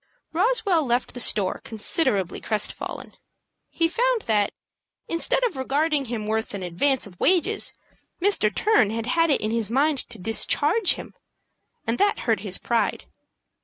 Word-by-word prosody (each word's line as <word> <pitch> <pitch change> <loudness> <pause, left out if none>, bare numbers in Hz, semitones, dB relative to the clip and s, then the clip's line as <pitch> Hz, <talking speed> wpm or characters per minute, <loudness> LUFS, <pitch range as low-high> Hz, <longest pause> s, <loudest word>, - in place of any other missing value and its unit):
Roswell 390 -3 +2
left 245 -1 -1
the 245 - -7
store 205 -5 +2
considerably 210 - 0
crest 215 -2 -1
fallen. - - -8 0.6
He 330 - +1
found 485 +5 0
that, 210 -2 +1 0.6
instead 335 +8 +1
of 480 - 0
regarding 285 +2 0
him 225 -3 -4
worth 220 0 -2
an 195 - -5
advance 250 +10 0
of 180 -4 -14
wages, 375 +4 +2 0.5
Mr. 370 - +2
Turner 225 - +2
had 230 -1 -3
had 330 +6 +2
it 285 - +2
in 215 - -1
his 225 -3 -1
mind 280 +4 +2
to 235 - -6
discharge 290 - +2
him; - - -10 0.7
and 230 +1 -1
that 410 0 +2
hurt 225 -2 +1
his 195 -2 -3
pride. 235 -1 -1
250 Hz, 155 wpm, -24 LUFS, 215-335 Hz, 0.7 s, Roswell